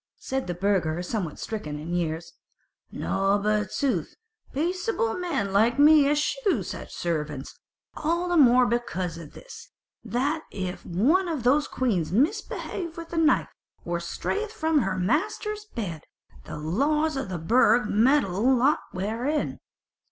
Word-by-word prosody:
Said 265 -7 -3
a 175 - -2
burgher 175 -3 0
somewhat 180 -5 -3
stricken 155 -10 -5
in 160 +4 -6
years, 165 -1 -2 0.6
"Nought 195 +1 0
but 210 -1 +1
sooth; 235 - -1 0.4
peaceable 345 - -1
men 285 - -2
like 225 +4 +4
to 285 - +2
me 300 -2 +7
eschew 335 +9 +1
such - - -7
servants; 150 -5 -4 0.4
all 340 +3 -1
the 350 - 0
more 250 -5 +6
because 185 -8 -2
of 155 -3 -11
this, - - -12 0.3
that 265 +8 -1
if 185 -2 -5
one 290 - +2
of 310 -8 -3
these 280 +4 +3
queens 195 -12 -1
misbehave 335 - -1
with 335 0 -7
the 340 - -5
knife, 320 -2 +3 0.4
or 170 0 -1
strayeth 410 - -3
from 320 -7 +1
her 195 -6 -1
master's 415 - -1
bed, 195 - -5 0.4
the - - -7
laws 285 - +1
of 270 -6 -3
the 180 - -3
Burg 225 +5 +3
meddle 235 0 +3
not 265 +5 +3
therein. 230 +11 -2
240 Hz, 145 wpm, -26 LUFS, 185-310 Hz, 0.6 s, me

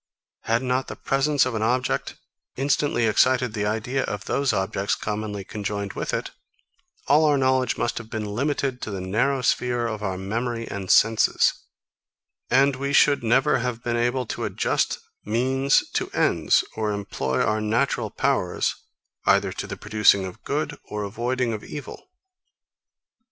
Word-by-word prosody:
Had 115 +2 +1
not 130 +1 0
the - - -6
presence 140 +1 +1
of 130 - -2
an 110 - -2
object, 125 +3 0 0.4
instantly 135 -2 +1
excited 125 +2 +3
the 105 -1 -1
idea 110 +5 -1
of 100 -1 -5
those 140 -1 +1
objects, 95 +1 -1
commonly 105 -1 -4
conjoined 100 -1 -4
with - - -3
it, - - -3 0.7
all 150 +2 +4
our 145 -2 +4
knowledge 130 -2 +2
must 120 - -1
have 110 -2 -11
been 110 -1 -3
limited 130 +4 -2
to - - -4
the 100 -2 -4
narrow 120 +9 0
sphere 120 -1 +1
of 110 -2 -3
our 95 -3 -2
memory 115 +4 -3
and 100 -2 -6
senses; 115 0 +4 1.0
and 135 +1 +4
we 140 +1 -2
should 145 -3 +4
never 120 +4 +3
have 120 -1 -3
been 120 -2 -1
able 120 +2 0
to - - -5
adjust - - 0 0.3
means 130 +5 +2
to - - -1
ends, - - +3
or 110 -1 -1
employ 70 -10 -2
our 110 0 +1
natural 110 +1 0
powers, 100 -8 0 0.5
either - - +4
to - - -5
the - - -6
producing 105 -2 +3
of 95 - -9
good, - - -2
or 105 0 -4
avoiding 120 +4 -1
of 105 - -5
evil. 150 - -9
115 Hz, 155 wpm, -24 LUFS, 105-130 Hz, 1.0 s, all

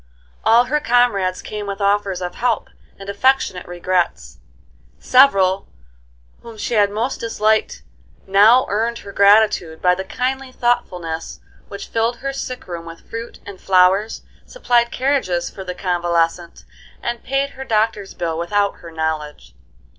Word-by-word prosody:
All 230 +2 +5
her 300 +4 0
comrades 230 -9 +1
came 210 -1 -6
with 200 0 -5
offers 200 -2 0
of 180 0 -4
help 245 +5 -1 0.3
and 195 - -11
affectionate 200 -3 +1
regrets. 175 - -2 0.6
Several 195 -8 +4 0.7
whom 230 -1 -11
she 225 - -3
had 205 -2 +4
most 225 +6 -3
disliked 215 - 0 0.4
now 210 +6 +5
earned 230 +3 -1
her 200 - -8
gratitude 200 -5 +3
by 180 0 +3
the 190 +1 -4
kindly 260 +6 -3
thoughtfulness 180 -10 -2 0.3
which 200 0 -8
filled 230 +1 0
her 275 +3 -5
sick 255 -2 -6
room 170 -2 -7
with 165 0 -12
fruit 230 +1 -7
and 200 -2 -10
flowers, 190 +3 +2 0.2
supplied 240 - +1
carriages 250 -11 -1
for 195 - -8
the 180 -1 -6
convalescent, 175 -2 -1 0.4
and 240 0 -3
paid 275 +1 -1
her 265 - -8
doctor's 215 -4 -1
bill 165 -2 -3
without 200 +4 0
her 170 - -11
knowledge. 155 - -4
200 Hz, 140 wpm, -19 LUFS, 180-235 Hz, 0.7 s, All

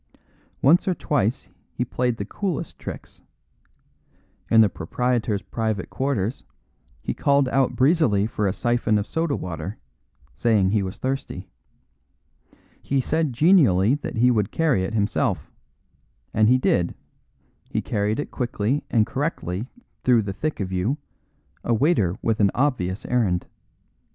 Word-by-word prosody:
Once 165 +9 +5
or 185 - +2
twice 125 -7 -1 0.3
he 125 - -1
played 125 -1 -1
the 100 - -4
coolest 185 - -4
tricks. - - -9 1.3
In 115 - +6
the 110 - +6
proprietor's 110 +3 -1
private 110 -4 -3
quarters 130 -5 -1 0.6
he - - -2
called 140 -1 +2
out 135 -1 +1
breezily 130 - +3
for 105 -2 -1
a - - +2
syphon 120 0 +1
of 105 - -1
soda 160 0 -1
water, 90 +3 -5 0.6
saying 105 - +2
he 105 -1 +2
was 95 0 -5
thirsty. 130 -8 -4 1.3
He 140 - 0
said 155 +2 0
genially 120 - +4
that 145 - -4
he 125 +2 +4
would 105 -4 +1
carry 150 -13 +1
it 105 +4 -3
himself, 105 -1 0 0.8
and 110 +1 +4
he 130 - +5
did; 85 -8 +1 0.7
he - - -1
carried 105 +2 -1
it - - -4
quickly 125 +1 -1
and 110 -3 +3
correctly 125 - -3 0.4
through 120 -3 +4
the 100 -1 -4
thick 155 +9 -3
of 95 -2 -3
you, 95 +10 0 0.7
a 120 - +1
waiter 110 - +2
with 110 -1 +1
an 100 -2 +5
obvious 115 -9 0
errand. 100 -8 +1
115 Hz, 140 wpm, -24 LUFS, 100-135 Hz, 1.3 s, In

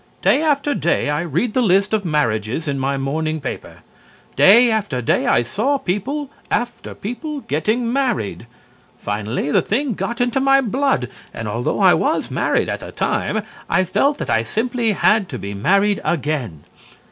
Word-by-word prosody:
Day - - +4
after 290 -2 +1
day 170 - 0
I 150 +2 0
read 175 - -1
the 255 - +2
list 200 -1 +2
of 215 -2 +1
marriages 150 - -1
in 140 -1 -1
my 135 +1 -1
morning 155 +3 -2
paper. 140 - -7 0.5
Day 235 +5 +6
after 205 - -1
day 120 - +1
I - - +3
saw 225 - 0
people 270 +8 -3 0.2
after 240 0 -3
people 285 +7 -5
getting 225 - -1
married. 240 - -1 0.5
Finally 105 +7 -3
the - - +4
thing 255 +4 -1
got 210 +5 -4
into 245 +1 +1
my 270 0 +4
blood, 260 - 0 0.3
and 115 - -5
although 115 +4 -2
I - - +7
was - - 0
married - - +1
at - - -3
the - - -9
time, - - -1 0.3
I 185 +3 +3
felt 280 - +1
that - - -5
I 115 - +3
simply 230 - -1
had 205 -1 +2
to 130 - -5
be 100 -1 -6
married 200 - +2
again. 140 - -2
195 Hz, 170 wpm, -20 LUFS, -, 0.5 s, I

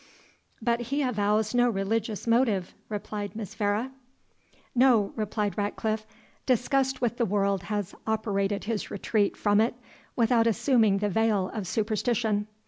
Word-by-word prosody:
"But 235 0 +2
he 285 +1 +1
avows 215 -2 +1
no 245 0 +4
religious 215 +1 -2
motive," 230 -6 +2 0.2
replied 205 -1 -5
Miss 215 -4 -6
Vere. 210 +5 -1 0.8
"No," 240 -5 +4
replied 210 -1 -2
Ratcliffe; 215 +1 -2 0.4
"disgust 265 +1 +1
with 240 -1 0
the 240 - +1
world 200 -1 +1
has 205 -2 -3
operated 205 -2 0
his 220 -1 -3
retreat 205 +1 0
from 205 0 +3
it 230 +2 +1 0.4
without 230 -1 +3
assuming 225 -3 +3
the 205 +1 0
veil 210 -2 +1
of 210 -5 -4
superstition. 215 0 0
215 Hz, 135 wpm, -27 LUFS, 205-235 Hz, 0.8 s, no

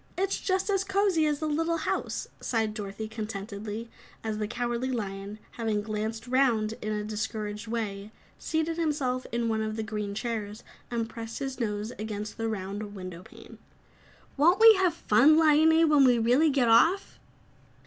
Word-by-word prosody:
"It's 390 +1 0
just 380 +1 0
as 390 -1 +1
cozy 385 -5 +2
as 295 +1 -1
a - - +1
little 325 +2 0
house," 315 - -2
sighed 220 -3 -1
Dorothy 210 0 -5
contentedly, 215 0 -6 0.4
as 215 -1 -3
the 210 - -1
Cowardly 240 +2 -2
Lion, 200 -3 -4
having 220 -3 -2
glanced 220 +1 -4
round 245 -4 +2
in 215 - -3
a 210 0 -2
discouraged 215 0 -4
way, 215 -3 -4 0.3
seated 320 +1 -1
himself 285 -6 -1
in 235 0 -1
one 220 -1 0
of 215 0 -3
the 220 - -3
green 210 -1 -4
chairs 215 -1 -4 0.3
and 230 -2 -2
pressed 230 0 -7
his 270 -1 -4
nose 210 -1 -2
against 210 -1 -5
the 225 - -1
round 205 0 -5
window 185 -2 -7
pane. - - -14 0.8
"Won't 340 +8 +4
we 450 0 +10
have 365 -3 +2
fun, 290 +3 +5
Liony, 320 +1 +5
when 295 -2 +5
we 250 -2 +5
really 250 +8 +3
get 270 -4 +2
off?" 330 +13 +3
230 Hz, 165 wpm, -28 LUFS, 215-295 Hz, 0.8 s, we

